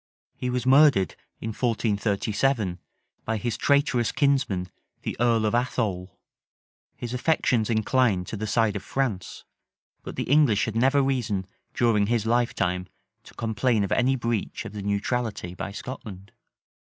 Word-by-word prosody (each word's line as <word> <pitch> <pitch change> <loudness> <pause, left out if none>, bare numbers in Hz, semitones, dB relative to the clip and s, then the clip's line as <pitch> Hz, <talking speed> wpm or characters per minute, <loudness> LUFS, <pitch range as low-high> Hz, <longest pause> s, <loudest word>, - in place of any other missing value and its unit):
He 125 - -3
was 125 -1 -1
murdered, 135 -7 +5 0.3
in 110 - -4
1437, 110 -2 0 0.4
by 110 0 -1
his 115 +1 -2
traitorous 140 -5 +2
kinsman 130 -11 +1 0.3
the - - -3
earl 115 -2 +3
of 105 - 0
Athole. 105 -7 -1 0.8
His 120 0 -5
affections 125 -4 +1
inclined 110 -3 +2
to 110 - -6
the 110 +1 -4
side 110 -1 +2
of 100 - -3
France; 115 -9 -3 0.6
but - - -8
the - - -2
English 140 -7 +3
had 110 - -4
never 135 +4 +3
reason 115 -8 -1 0.3
during 110 -4 +3
his 115 -1 0
lifetime 100 -6 0 0.4
to - - -15
complain 115 -1 +1
of 100 - -3
any 130 +2 +3
breach 115 -4 -2
of - - -7
the 105 - -5
neutrality 100 -1 -2
by 100 - -5
Scotland. 100 -5 -8
115 Hz, 140 wpm, -25 LUFS, 100-125 Hz, 0.8 s, murdered